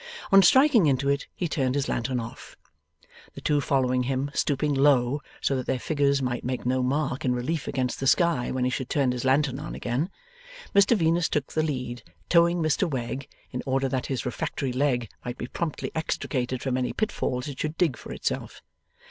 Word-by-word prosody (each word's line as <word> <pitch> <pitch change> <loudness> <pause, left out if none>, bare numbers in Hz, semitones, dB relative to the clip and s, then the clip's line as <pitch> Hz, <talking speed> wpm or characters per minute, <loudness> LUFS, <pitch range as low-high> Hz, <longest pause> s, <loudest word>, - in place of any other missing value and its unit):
On 195 0 +9
striking 250 - +6
into 140 0 +2
it 140 0 0
he 175 - -1
turned 135 -5 0
his 140 -1 0
lantern 125 +1 -1
off. 115 0 -9 0.8
The - - -8
two 145 -1 +2
followed 130 -3 +1
him, 135 +2 -1
stooping 145 0 +1
low, 135 -1 +3 0.2
so 135 - +1
that 130 - -3
their 130 - +1
figures 140 -1 +1
might 125 -1 -2
make 125 -1 -3
no 130 +1 +1
mark 135 +2 -1
in 125 -1 +1
relief 140 +5 -2
against 130 -2 -1
the 135 - -1
sky 165 -4 +3
when 130 -1 -1
he 125 - +1
should 130 0 -3
turn 135 -4 +2
his 125 0 -3
lantern 135 0 +2
on 155 - -6
again. 130 +9 -1 0.6
Mr 200 +3 +5
Venus 165 -1 +2
took 150 -2 -2
the 155 - +2
lead, 125 -6 -3 0.3
towing 170 0 +4
Mr 155 +4 +1
Wegg, 130 0 -4 0.2
in 125 - -3
order 135 0 +1
that 130 -1 -2
his 135 -3 -3
refractory 125 +1 -3
leg 125 -3 +1 0.2
might 120 0 -5
be - - -4
promptly 155 +4 -4
extricated 130 -5 -2
from 130 -2 0
any 125 -1 -1
pitfalls 130 - -2
it 140 -3 -7
should 155 +1 -3
dig 160 -8 +2
for - - -10
itself. - - -4
135 Hz, 195 wpm, -26 LUFS, 125-155 Hz, 0.8 s, On